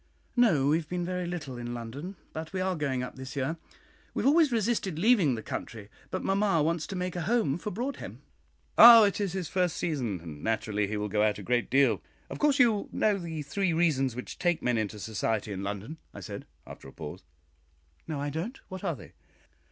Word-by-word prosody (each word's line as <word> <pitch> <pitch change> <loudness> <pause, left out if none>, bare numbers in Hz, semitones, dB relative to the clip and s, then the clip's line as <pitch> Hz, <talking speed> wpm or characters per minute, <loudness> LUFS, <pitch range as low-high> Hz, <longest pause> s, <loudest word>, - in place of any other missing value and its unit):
"No; 170 - +4
we 155 - +4
have 165 - -6
been 180 -1 -2
very 180 0 -2
little 145 -8 -5
in 120 0 -5
London, 135 - -6 0.2
but 160 +3 -6
we 190 - -1
are 185 0 0
going 135 -5 -1
up 125 - -7
this 130 0 -8
year. 140 +4 -1 0.6
We - - -1
have - - +3
always 305 0 +5
resisted 215 -6 0
leaving 185 - +4
the 110 - -6
country, 110 -3 -6 0.2
but - - -3
mamma 195 -5 +2
wants 165 0 0
to 195 - -5
make 180 -1 -3
a 175 - -2
home 180 - +1
for 210 - -4
Broadhem." 245 +8 -5 0.6
"Ah! 230 -1 +12
it 205 0 +1
is 195 -4 -1
his 185 -4 -3
first 180 -1 0
season, 125 - -2
and 80 -3 -10
naturally 105 -2 0
he 105 +1 -3
will 105 0 -2
go 105 +1 0
out 105 -1 +2
a - - -8
great 120 -1 0
deal. 130 -6 +3 0.3
Of - - -6
course 295 -2 +3
you 230 -7 +3
know 205 -2 +1
the 160 -3 -5
three 175 +4 0
reasons 140 -7 +2
which 125 - -7
take 175 -2 +1
men 120 -2 +2
into 105 0 -3
society 110 0 -2
in 95 -1 -4
London," 105 +10 -5 0.2
I - - -7
said, - - -7 0.2
after - - -11
a - - -11
pause. - - -8 0.9
"No, 150 -3 -3
I 145 0 -2
don't. 180 - -4
What 185 -1 -7
are 170 - -1
they?" - - -13
160 Hz, 215 wpm, -29 LUFS, 120-190 Hz, 0.9 s, Ah